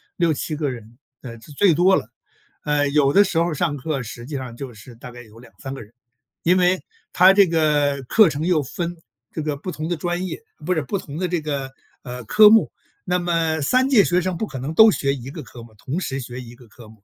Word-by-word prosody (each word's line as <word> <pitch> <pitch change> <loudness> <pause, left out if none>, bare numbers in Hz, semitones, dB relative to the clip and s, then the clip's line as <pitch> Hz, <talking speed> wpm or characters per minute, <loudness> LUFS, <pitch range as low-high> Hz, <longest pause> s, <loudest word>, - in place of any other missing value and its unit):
6-7 160 -2 -1
个 150 -2 -2
人， 120 -2 -10 0.2
呃， 115 -3 -9
是 145 - -15
最 170 +4 +3
多 185 +4 +4
了。 110 - -3 0.5
呃， 145 -1 +1
有 140 -1 +2
的 200 - +6
时 185 -4 -3
候 170 - +3
儿 - - -3
上 150 -1 -1
课 140 0 -3
实 120 +1 -9
际 145 +2 -7
上 125 -3 -7
就 130 -4 -7
是 115 +3 -14
大 125 +1 -11
概 120 0 -11
有 110 -1 -17
2-3 135 +2 -10
个 135 - -8
人， 105 +3 -20 0.5
因 180 +2 +3
为 180 +1 +2 0.3
他 185 +2 +6
这 200 0 +6
个 150 -4 +1
课 215 -4 +5
程 150 +2 -3
又 170 -5 +2
分 175 +6 -5 0.4
这 160 - -5
个 150 -2 -2
不 180 +6 -6
同 155 0 -5
的 175 - -1
专 175 +3 -3
业， 185 - -6 0.2
不 180 - +1
是 160 - 0
不 170 +8 -3
同 150 -4 -8
的 185 - -1
这 175 -2 -2
个， 140 -3 -4 0.3
呃， 125 -1 -7
科 210 - +7
目。 225 0 +4 0.4
那 180 0 +1
么 165 -3 0
3 255 - +2
届 245 -7 +5
学 180 -1 +1
生 185 0 -2
不 215 - -3
可 135 - -8
能 140 +5 -4
都 220 +5 +8
学 140 -8 0
1 135 -1 -8
个 155 0 -8
科 120 -1 -13
目 115 -1 -15
同 135 - -4
时 135 -7 -4
学 125 0 -7
1 120 -1 -12
个 120 -1 -18
科 110 +1 -15
目。 110 -2 -19
150 Hz, 245 characters per minute, -21 LUFS, 125-175 Hz, 0.5 s, 都